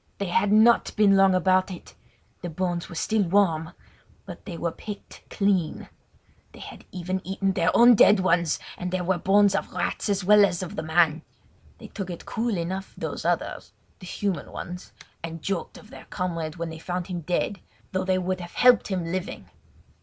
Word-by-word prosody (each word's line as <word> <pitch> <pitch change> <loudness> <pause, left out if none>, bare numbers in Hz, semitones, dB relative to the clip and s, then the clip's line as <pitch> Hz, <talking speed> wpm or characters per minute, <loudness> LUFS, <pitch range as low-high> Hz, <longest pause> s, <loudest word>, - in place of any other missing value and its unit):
They 200 -2 -3
had 200 +3 +1
not 220 +2 +4
been 205 -2 +5
long 195 -1 +5
about 185 +1 +2
it! 180 -2 -10 0.5
The 175 - -5
bones 175 +1 -3
were - - -9
still 215 +6 0
warm; 170 -3 +1 0.5
but - - -10
they 175 -5 -6
were 170 0 -2
picked 205 +4 -10
clean. 195 -5 -1 0.6
They - - -14
had - - -11
even 185 +1 -3
eaten 195 0 -1
their 175 -2 +1
own 240 +1 +8
dead 205 -2 +6
ones 170 -3 +1 0.2
and 180 - -3
there 185 0 -2
were 180 0 0
bones 200 +2 +4
of 195 - -2
rats 180 +4 -2
as 200 -1 0
well 205 +2 +6
as 185 -2 +1
of 180 - -7
the - - -3
man. 160 0 +2 0.6
They - - -12
took 195 -3 -6
it 175 - -7
cool 230 -3 -2
enough 185 +3 -5
those - - -5
other—the 185 - -4
human 195 -1 -3
ones—and 165 -2 -9
joked 195 -3 -3
of 210 - -16
their - - -12
comrade 165 -4 -4
when 170 -1 -4
they 160 - -9
found 180 +1 -4
him 175 -2 -5
dead, 180 +4 -2 0.3
though 185 - -1
they 185 0 +1
would 185 0 -2
have 175 -1 -9
helped 250 -1 +5
him 185 -4 -2
living. 185 +2 -5
185 Hz, 185 wpm, -25 LUFS, 170-200 Hz, 0.6 s, own